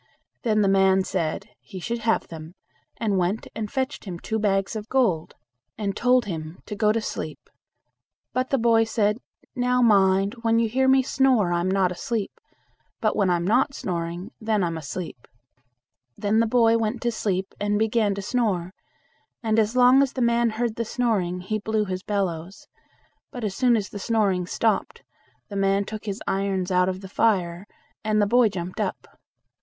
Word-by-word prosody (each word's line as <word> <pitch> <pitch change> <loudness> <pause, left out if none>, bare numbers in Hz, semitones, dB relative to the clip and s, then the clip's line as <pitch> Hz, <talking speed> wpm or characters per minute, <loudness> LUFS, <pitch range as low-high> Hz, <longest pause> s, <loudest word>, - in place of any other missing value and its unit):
Then 215 -3 +2
the - - +3
man 190 0 +4
said, 185 +3 -3
he 190 - -10
should 235 +6 -3
have 225 0 0
them, 160 +1 -9 0.4
and 210 -4 0
went 185 +5 -1
and 215 -2 -5
fetched 265 -1 -3
him 180 -3 -5
two 220 +5 -3
bags 195 0 0
of 215 0 -6
gold, 195 -12 +1 0.4
and 200 -2 -2
told 250 +1 +3
him 160 -3 -6
to 210 - -6
go 210 0 +3
to 225 - +1
sleep. 215 - -6 0.8
But 255 0 -1
the 275 - +2
boy 225 -1 +4
said, 215 -1 0 0.4
"Now 250 0 +2
mind, 195 -2 +4
when 230 0 +2
you 230 0 +3
hear 265 +4 +1
me 265 0 +5
snore 255 -9 +2
I'm 175 +2 0
not 190 -1 +2
asleep, 205 +4 -3 0.7
but 215 - +1
when 200 -3 +2
I 175 - +3
am 170 0 -2
not 260 +7 +2
snoring, 175 +3 -4
then 215 -3 +1
I'm 170 -1 -1
asleep." 155 -3 -7 0.9
Then 210 +2 +1
the 230 - +3
boy 230 -1 +4
went 225 +2 -1
to 240 - +1
sleep 195 -4 -2
and 205 0 0
began 220 -2 +1
to 200 - -5
snore, 195 -5 -1 0.7
and 220 0 +2
as 220 +2 +1
long 250 +2 +6
as 275 -1 +1
the 260 - -3
man 235 0 +3
heard 225 0 -2
the 230 - 0
snoring, 210 -7 -1
he 215 +4 -2
blew 215 0 0
his 185 -1 -4
bellows; 190 -3 -3 0.6
but 245 - -7
as 205 -3 -1
soon 250 +1 +3
as 210 -3 -2
the 205 - -7
snoring 195 -4 +1
stopped, 220 +2 -1 0.5
the 200 - -7
man 195 0 +2
took 215 +1 -7
his 200 -2 -4
irons 195 -1 -1
out 180 0 +3
of 185 0 -4
the 190 - -8
fire, 185 -3 0 0.4
and 215 -1 +1
the 205 - +4
boy 235 +2 +4
jumped 180 -1 -6
up. - - -3
210 Hz, 185 wpm, -24 LUFS, 190-230 Hz, 0.9 s, long